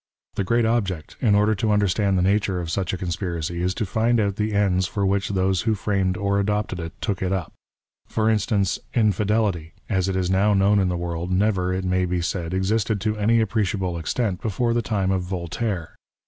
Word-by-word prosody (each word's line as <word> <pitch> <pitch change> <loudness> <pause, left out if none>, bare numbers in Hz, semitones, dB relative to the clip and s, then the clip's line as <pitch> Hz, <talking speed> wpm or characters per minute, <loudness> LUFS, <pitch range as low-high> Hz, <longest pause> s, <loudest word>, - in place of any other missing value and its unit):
The 100 - -1
great 115 +4 +2
object, 100 -9 -1
in 105 -5 +4
order 105 +1 +3
to 110 +2 -1
understand 100 -1 +2
the 90 - +2
nature 100 -1 +1
of 85 -2 -4
such 95 0 -1
a 95 - -3
conspiracy, 85 -2 -3
is 90 +1 0
to 110 - -1
find 115 +4 +1
out 100 -2 0
the 110 0 0
ends 95 -3 +2
for 100 -1 -1
which 100 0 0
those 95 -2 +1
who 110 -2 +1
framed 95 -2 0
or 100 +1 +1
adopted 105 -2 -1
it, 85 +4 -7
took 100 -4 -2
it 95 -1 0
up. 95 -4 -2 0.6
Por 110 -1 0
instance, 105 -3 +1 0.2
Infidelity, 105 -6 +1 0.2
as 95 -3 +1
it 95 - -1
is 95 -1 0
now 100 +2 +3
known 100 +1 +4
in 95 -2 +2
the 90 - -1
world, 85 0 -3
never, 95 -1 +1
it 95 0 -2
may 90 0 +1
be 90 0 -1
said, 85 -1 -2
existed 100 +3 0
to 110 0 0
any 115 +2 +3
appreciable 95 -4 -1
extent 95 +3 -1
before 115 +2 0
the 120 - +1
time 100 -5 0
of 95 -2 0
Yoltaire. 90 0 -3
95 Hz, 205 wpm, -23 LUFS, 90-105 Hz, 0.6 s, in